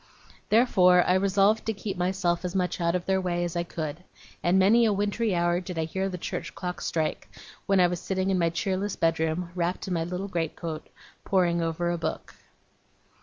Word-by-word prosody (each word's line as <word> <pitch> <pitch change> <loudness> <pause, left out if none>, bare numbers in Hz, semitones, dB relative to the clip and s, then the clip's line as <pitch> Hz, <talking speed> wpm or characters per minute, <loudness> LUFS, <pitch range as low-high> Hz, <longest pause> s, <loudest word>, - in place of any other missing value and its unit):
Therefore 180 -6 +5
I 180 - +3
resolved 195 +3 +3
to 220 - +1
keep 200 -1 -5
myself 180 -1 0
as 180 +1 -4
much 180 -1 -1
out 170 +1 +1
of 180 - -2
their 190 0 +1
way 175 -1 -1
as 175 0 -3
I 170 - +1
could; 160 -1 -5 0.4
and 175 +2 +3
many 210 +5 +5
a 220 - +4
wintry 205 +1 0
hour 175 0 +2
did 180 -1 -7
I 160 - +1
hear 190 +5 -2
the 180 - -5
church - - -5
clock 180 -1 -5
strike, 160 -2 -2 0.4
when 195 -1 +3
I 180 - +6
was 175 -1 -1
sitting 190 0 -1
in 185 - +1
my 170 -1 +3
cheerless 190 +4 -2
bedroom, 165 +1 0
wrapped 175 +1 -2
in 185 - -2
my 165 -1 0
little 180 +3 -4
great 170 -4 -2
coat, 160 -2 -6 0.4
poring 175 -3 +2
over 165 +1 -1
a 175 - -2
book. - - -4
180 Hz, 205 wpm, -27 LUFS, 170-190 Hz, 0.4 s, I